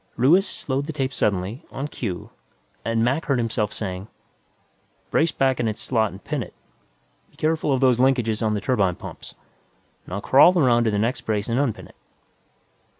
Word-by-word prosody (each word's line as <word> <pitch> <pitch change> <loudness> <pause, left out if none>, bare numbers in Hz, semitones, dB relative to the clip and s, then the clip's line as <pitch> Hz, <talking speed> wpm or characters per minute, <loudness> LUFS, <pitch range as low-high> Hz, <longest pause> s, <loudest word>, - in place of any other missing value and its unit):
Ruiz 170 - +4
slowed 140 -3 -3
the 160 - -4
tape 135 -3 -2
suddenly, 100 +2 -1
on 140 +2 -4
cue, 95 - -5 0.5
and 115 0 0
Mac 135 +7 0
heard 140 - +1
himself 110 -3 -1
saying, 95 -1 -5 0.5
"... - - -40
Brace 165 0 +2
back 135 -3 +1
in 120 - +1
its 110 -1 -3
slot 110 -4 +1
and 95 +2 -12
pin 150 -3 -2
it. - - -9 0.7
Be - - -28
careful 155 -1 0
of 135 -1 +1
those 125 -2 +4
linkages 120 -4 +2
on 110 -1 +1
the 105 - -2
turbine 100 -9 +1
pumps. - - -10 0.7
Now 95 +3 -4
crawl 155 - +6
around 120 -6 +4
to - - +3
the 105 - 0
next 120 +4 0
brace 105 -1 -2
and 115 +3 +1
unpin 140 -6 -1
it." - - -20
120 Hz, 185 wpm, -23 LUFS, 105-135 Hz, 0.7 s, crawl